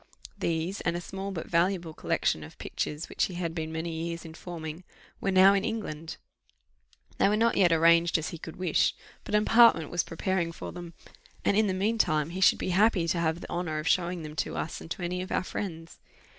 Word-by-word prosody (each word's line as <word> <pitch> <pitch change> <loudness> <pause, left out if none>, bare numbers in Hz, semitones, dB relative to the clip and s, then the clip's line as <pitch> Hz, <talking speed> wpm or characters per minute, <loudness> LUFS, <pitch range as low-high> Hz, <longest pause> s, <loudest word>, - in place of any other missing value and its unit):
These, 170 +4 -1
and 170 -1 0
a - - -3
small 190 +2 -6
but 175 -5 -5
valuable 170 -1 +1
collection 80 - 0
of 75 - -12
pictures 150 +2 -4
which - - 0
he 185 - -7
had 170 -2 -3
been 160 -1 -4
many 160 +1 -3 0.2
years 170 0 -5
in 160 - -9
forming, 165 -1 -7 0.4
were - - -1
now 190 +1 +7
in 200 -1 +1
England: 185 -9 -4 1.0
they - - +5
were 210 - +2
not 230 +1 +3
yet 180 -3 +4
arranged 170 +1 +5
as 160 - -3
he 170 - -8
could 160 - -8
wish, 180 -4 +1 0.3
but - - -2
an 210 - +4
apartment 225 -10 +5
was 175 0 +1
preparing 175 0 -1
for - - -7
them; 175 -2 -9 0.5
and 200 - +3
in 215 0 +3
the 190 - 0
mean 215 +4 0
time, 155 -4 +2
he 185 +2 -5
should - - +6
be - - -3
happy 190 -2 +3
to 175 -1 +1
have 165 +1 0
the - - -9
honour 170 -3 -2
of 155 +1 -3
showing 175 -1 +1
them 150 0 -8
to - - -2
us - - -4
and - - -10
to 180 - -5
any 180 +1 -2
of 185 - -7
our - - +1
friends. 165 -4 -6
175 Hz, 225 wpm, -28 LUFS, 165-190 Hz, 1.0 s, now